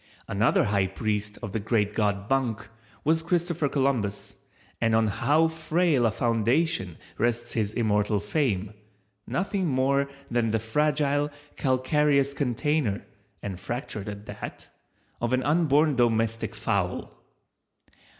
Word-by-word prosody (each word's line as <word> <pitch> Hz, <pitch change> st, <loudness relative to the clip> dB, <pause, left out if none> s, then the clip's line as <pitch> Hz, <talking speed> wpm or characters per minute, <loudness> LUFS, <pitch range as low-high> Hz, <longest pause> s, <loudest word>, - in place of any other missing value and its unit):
Another 105 Hz, +4 st, +3 dB
high 100 Hz, -2 st, +1 dB
priest 105 Hz, +1 st, -2 dB
of 100 Hz, -, -4 dB
the 110 Hz, -, -1 dB
Great 105 Hz, -1 st, 0 dB
God 100 Hz, -2 st, 0 dB
Bunk 125 Hz, -4 st, 0 dB, 0.4 s
was 160 Hz, +2 st, +3 dB
Christopher 170 Hz, -3 st, 0 dB
Columbus, 130 Hz, -8 st, -1 dB, 0.5 s
and 115 Hz, -1 st, +3 dB
on 110 Hz, 0 st, +4 dB
how 135 Hz, +10 st, +3 dB
frail 160 Hz, -4 st, +2 dB
a -, -, +1 dB
foundation 115 Hz, -, +1 dB, 0.2 s
rests 120 Hz, +1 st, 0 dB
his 110 Hz, -2 st, -1 dB
immortal 105 Hz, -2 st, +1 dB
fame—nothing 105 Hz, -, -3 dB
more 140 Hz, 0 st, +2 dB, 0.2 s
than 120 Hz, -1 st, +1 dB
the 110 Hz, -, +2 dB
fragile, 145 Hz, +4 st, +1 dB, 0.3 s
calcareous 140 Hz, +1 st, +2 dB
container, 140 Hz, -3 st, 0 dB, 0.4 s
(and 95 Hz, -3 st, -5 dB
fractured 110 Hz, -1 st, -4 dB
at 100 Hz, 0 st, -8 dB
that) -, -, -8 dB, 0.5 s
of 120 Hz, +1 st, 0 dB
an 130 Hz, 0 st, +2 dB
unborn 150 Hz, -1 st, +3 dB
domestic 115 Hz, -2 st, +1 dB
fowl. 100 Hz, -5 st, -1 dB
120 Hz, 120 wpm, -26 LUFS, 105-145 Hz, 0.5 s, on